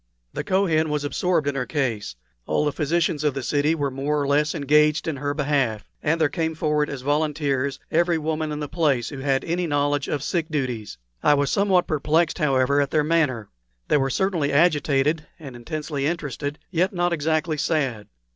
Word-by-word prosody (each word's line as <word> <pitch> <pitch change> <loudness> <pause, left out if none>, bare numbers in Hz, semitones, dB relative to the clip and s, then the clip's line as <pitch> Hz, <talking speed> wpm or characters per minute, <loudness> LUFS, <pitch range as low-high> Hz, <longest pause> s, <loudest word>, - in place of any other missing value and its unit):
The - - -3
Kohen 185 -6 +1
was 150 -1 -1
absorbed 160 +1 0
in 145 - +1
her 130 -2 -3
case; 115 - -2 0.3
all 150 - +1
the 150 - +1
physicians 155 0 0
of 150 -3 +1
the 135 - -3
city 145 +5 +1
were 145 -3 -1
more 140 +3 -1
or 140 - -1
less 150 +3 +2
engaged 150 +1 +3
in 155 -3 -2
her 145 +1 -2
behalf; 135 -8 0 0.2
and 160 +3 +1
there 155 - +4
came 160 +1 -2
forward 150 -1 0
as 140 -2 -5
volunteers 145 -2 0
every 170 +1 +2
woman 155 0 -2
in 150 - -4
the 145 - -3
place 145 -7 0
who 140 - -7
had 135 0 0
any 175 +1 -1
knowledge 145 -1 0
of 145 -1 -2
sick 170 -2 -1
duties. 125 - -3 0.2
I 150 - +5
was 140 -1 0
somewhat 195 -3 +3
perplexed, 155 +2 +1
however, 140 -1 +2
at 140 - 0
their 155 0 +2
manner. 145 -9 0 0.4
They - - +4
were 135 -1 +1
certainly 170 -3 0
agitated 150 -1 +2
and 140 -6 -10
intensely 145 +2 -3
interested, 150 -3 -3
yet 180 +2 +1
not 175 -1 +1
exactly 155 0 0
sad. 135 -9 -1
150 Hz, 190 wpm, -23 LUFS, 140-160 Hz, 0.4 s, I